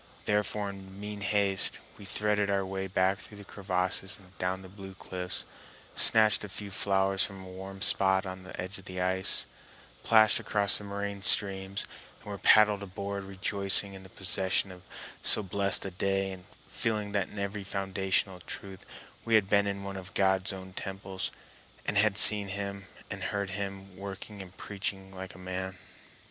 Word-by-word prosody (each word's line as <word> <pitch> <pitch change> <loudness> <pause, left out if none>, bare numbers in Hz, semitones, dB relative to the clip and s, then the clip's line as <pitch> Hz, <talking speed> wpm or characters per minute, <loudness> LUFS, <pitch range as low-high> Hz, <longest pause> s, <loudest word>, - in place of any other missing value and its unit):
Therefore, 105 -1 -1
in 95 0 -12
mean 105 0 -6
haste, 100 -2 +2 0.2
we 100 - -10
threaded 105 +1 0
our 100 -1 0
way 95 0 -4
back 95 +1 +1
through 105 - -12
the 100 - -11
crevasses 95 -1 0
and 95 -1 -20
down 95 +1 -2
the - - -10
blue 95 0 -11
cliffs, 90 -1 0 0.5
snatched 110 -1 +7
a 105 - -6
few 100 +1 -7
flowers 95 0 +1
from 95 -2 -5
a - - -11
warm 95 +1 -8
spot 95 -1 +2
on 95 0 -7
the 95 - -11
edge 95 +1 -6
of 95 - -15
the 90 0 -6
ice, 95 +1 +4 0.6
plashed 110 -2 +5
across 100 -2 +1
the - - -10
moraine 100 0 -5
streams, 95 0 +1 0.3
and 105 - -10
were 100 - -6
paddled 105 -2 +5
aboard, 100 0 -5
rejoicing 100 +1 0
in 95 - -10
the 95 - -14
possession 95 +1 0
of 90 -1 -12 0.4
so 110 - +6
blessed 100 +1 +2
a 95 - -4
day, 95 +1 -1
and 90 -1 -10 0.2
feeling 105 -3 -2
that 100 -2 -1
in - - -14
very 100 0 -4
foundational 95 -1 -1
truth 95 +2 -9 0.4
we 115 -1 +2
had 105 -3 +4
been 100 0 +3
in 100 0 -4
one 100 0 -6
of 95 0 -9
God's 95 -1 +2
own 95 -1 -9
temples 95 0 -5 0.6
and - - -2
had 100 -1 +3
seen 105 -1 +8
Him 100 0 -5 0.2
and - - -5
heard 100 -2 -3
Him 95 -1 -6
working 100 +1 -8
and 95 -1 -13
preaching 95 -1 -4
like 95 0 -8
a - - -12
man. 95 0 -5
95 Hz, 180 wpm, -29 LUFS, 95-100 Hz, 0.6 s, seen